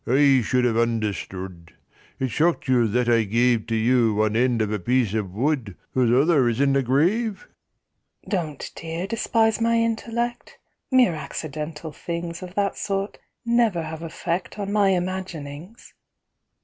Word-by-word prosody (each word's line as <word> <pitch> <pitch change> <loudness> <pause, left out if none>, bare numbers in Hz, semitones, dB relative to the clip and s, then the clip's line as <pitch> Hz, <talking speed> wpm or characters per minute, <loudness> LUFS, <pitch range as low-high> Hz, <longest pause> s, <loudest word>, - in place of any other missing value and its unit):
I 135 +1 +5
should 125 +3 +1
have 115 -2 +1
understood! 95 -6 -3 0.5
It 130 - -1
shocked 160 +5 +1
you 125 -3 +3
that 120 +3 0
I 115 -1 +4
gave 115 +2 +1
To 115 - -1
you 115 -1 +3
one 110 0 +1
end 120 0 +2
of 105 - -3
a 105 - -1
piece 120 +1 +1
of 105 -4 -2
wood 120 - -1 0.2
Whose 125 -3 +2
other 135 0 +4
is 115 +1 -2
in 140 -1 +3
a 135 - +3
grave?" 185 - +1 0.8
"Don't, 160 - -3
dear, 165 +2 -4
despise 225 +1 +1
my 230 0 +3
intellect, 230 +1 -2 0.3
Mere 255 -8 +4
accidental 155 0 -6
things 170 +2 -5
Of 185 0 -9
that 200 -1 0
sort 195 0 -3 0.3
never 235 -7 +2
have 160 0 -6
effect 170 +3 -4
On 200 -1 -3
my 205 -2 +3
imaginings." 180 - -4
150 Hz, 150 wpm, -24 LUFS, 120-190 Hz, 0.8 s, I